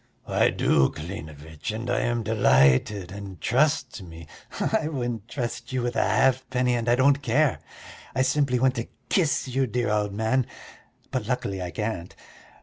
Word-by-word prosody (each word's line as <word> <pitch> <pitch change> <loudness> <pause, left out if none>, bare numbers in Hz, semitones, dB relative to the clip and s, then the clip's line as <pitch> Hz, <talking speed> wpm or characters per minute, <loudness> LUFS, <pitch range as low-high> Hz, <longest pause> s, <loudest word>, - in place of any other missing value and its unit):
"I - - +3
do, 65 - +3
Klinevitch, 80 -2 -8
and 110 +3 -4
I 120 - +1
am 120 -1 0
delighted, 90 -2 +3
and 100 -3 -8
trust 135 - +1
me...." 85 -2 -10 0.3
"I - - +1
wouldn't 120 -7 -3
trust 120 -1 -4
you 130 -1 -1
with 120 0 -2
a - - +3
halfpenny, 130 -1 +2
and 120 -1 0
I 120 - +5
don't 140 +2 +3
care. 140 +3 +2 0.6
I 130 - +3
simply 135 -1 +2
want 130 +1 +3
to 115 - -3 0.2
kiss 155 -8 +1
you, 130 +1 0
dear 120 0 -1
old 105 -1 0
man, 110 +5 0 0.6
but 125 -5 -2
luckily 100 -7 -2
I 90 - -3
can't. 105 -3 -4
120 Hz, 160 wpm, -25 LUFS, 100-130 Hz, 0.6 s, I